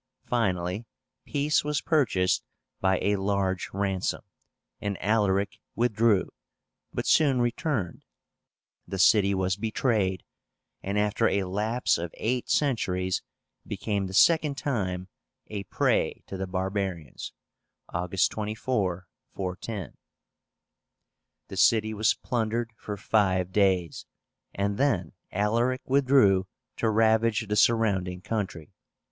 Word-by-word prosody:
Finally 95 -2 -1 0.4
peace 145 +1 +1
was 150 0 0
purchased 105 - +1 0.4
by 95 -1 +2
a 100 0 +2
large 95 -1 -1
ransom, 95 -1 -1 0.6
and 100 -2 -3
Alaric 100 -1 +1 0.2
withdrew, 115 -3 +2 0.6
but - - -3
soon 140 -5 +4
returned. 120 - -1 0.8
The 95 - -4
city 100 +1 +5
was 95 0 0
betrayed, 105 -4 0 0.6
and 100 +2 -2
after 105 +2 +2
a 100 0 +1
lapse 105 +4 0
of 85 0 -3
eight 125 +2 -1
centuries 95 -10 +1 0.5
became 100 -1 -2
the 95 - -6
second 155 - +4
time 95 -10 -2 0.4
a 100 -2 -5
prey - - 0
to - - -7
the 95 0 -3
barbarians 95 -5 -3 0.6
(24 - - -24
August, 95 0 -1 0.3
410). 95 +1 -5 1.5
The - - -8
city 110 -1 +4
was 110 0 +2
plundered 115 -1 -2
for 105 -2 -6
five 95 -3 +1
days, 95 -5 +1 0.4
and 100 +1 -2
then 95 - +1 0.2
Alaric 115 +6 +1
withdrew 130 -9 +4 0.3
to 110 - +1
ravage 110 0 +2
the 105 - -1
surrounding 100 -5 +2
country. 95 -7 -4
100 Hz, 110 wpm, -27 LUFS, 95-115 Hz, 1.5 s, city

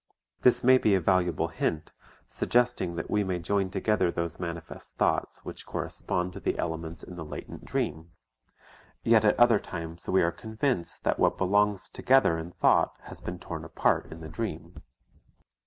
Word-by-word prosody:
This 125 - +4
may 130 +1 +7
be 105 -4 +3
a - - +3
valuable 90 -2 +1
hint, 80 -1 -2 0.4
suggesting 120 -8 0
that 80 - -4
we 105 0 +2
may 95 -2 -1
join 95 +2 0
together 95 -1 +1
those 85 -1 -3
manifest 85 -2 -7
thoughts - - 0
which - - -9
correspond 90 0 -3
to - - -7
the - - -1
elements 80 0 -4
in 90 - -10
the 85 - -5
latent 75 - -8
dream; 80 +3 -2 0.9
yet 115 -2 +5
at 105 - +3
other 120 -3 +6
times 85 0 -7
we 95 - +4
are 85 - +2
convinced 110 +2 -3
that - - 0
what - - +3
belongs 100 0 +2
together 130 -10 +3
in 80 +1 -6
thought - - +2
has - - -11
been 90 - -5
torn 80 -3 -7
apart 80 - +1
in 80 - -9
the 80 - -7
dream. 85 -4 -6
90 Hz, 170 wpm, -28 LUFS, 85-105 Hz, 0.9 s, may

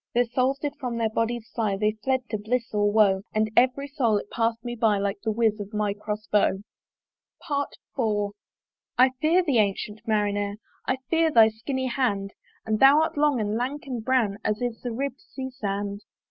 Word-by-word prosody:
Their 245 +1 +4
souls 255 +3 +1
did 290 0 -4
from 250 -4 -3
their 225 -1 0
bodies 230 0 -1
fly, 215 -4 0
They 210 +1 +2
fled 260 -2 0
to 215 - -1
bliss 230 +3 -2
or 205 0 +2
woe; 200 -3 +4
And 215 0 +1
every 260 +3 +3
soul 250 -7 +1
it 205 - -6
pass'd 230 0 0
me 240 0 -3
by, 220 -3 +2
Like 200 0 -2
the 225 - -2
whiz 220 -1 +1
of 205 +1 -7
my 210 -1 0
Cross 210 +1 -5
bow. 200 -2 +3 0.9
IV. 225 -8 -2 0.6
"I 255 +1 +6
fear 335 +4 +4
thee, 280 -9 +2
ancyent 210 +1 -1
Marinere! 205 -1 0 0.3
"I 260 - +1
fear 325 -1 +4
thy 225 -6 +6
skinny 260 +4 -3
hand; 225 -6 -1 0.3
"And 215 -1 0
thou 275 +3 +7
art - - -2
long 290 -3 +2
and 210 -1 -1
lank 260 +5 -3
and 250 -5 -4
brown 225 -5 +1
"As 215 0 0
is 245 -2 -3
the 245 - -4
ribb'd 270 +3 -3
Sea 265 -1 -7
sand. 205 -4 -3
225 Hz, 190 wpm, -26 LUFS, 210-260 Hz, 0.9 s, thou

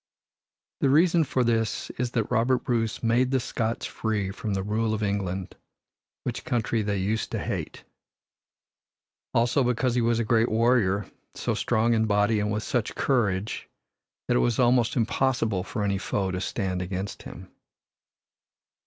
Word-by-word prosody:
The 135 - +2
reason 165 +3 +4
for 130 -3 0
this 115 -2 0
is 125 -1 -2
that 115 -2 -1
Robert 125 +1 +2
Bruce 115 -2 -1
made 120 +3 +3
the 135 0 +2
Scots 115 -1 -2
free 105 -3 -2
from 105 0 -3
the 95 - -1
rule 110 +2 0
of 110 - -3
England, 95 -2 -2 0.7
which 120 - -4
country 120 -5 0
they 100 -1 -1
used 105 +4 -1
to - - 0
hate. - - -4 1.5
Also 120 +4 +3
because 125 0 +1
he 125 - +2
was 115 0 +2
a 115 - +1
great 115 +1 +3
warrior, 110 -4 +2 0.3
so - - -1
strong 115 +2 +1
in 110 -1 +2
body 105 +1 +2
and 105 0 -1
with 105 +1 -2
such 120 -4 -1
courage 110 -6 0 0.6
that - - +3
it - - +3
was - - +1
almost 120 -2 +3
impossible 115 -4 +1
for 105 +2 -4
any 100 -1 0
foe 95 -1 -1
to 90 0 -3
stand 95 -3 -2
against 95 +2 -4
him. 90 +1 -11
110 Hz, 160 wpm, -26 LUFS, 100-120 Hz, 1.5 s, reason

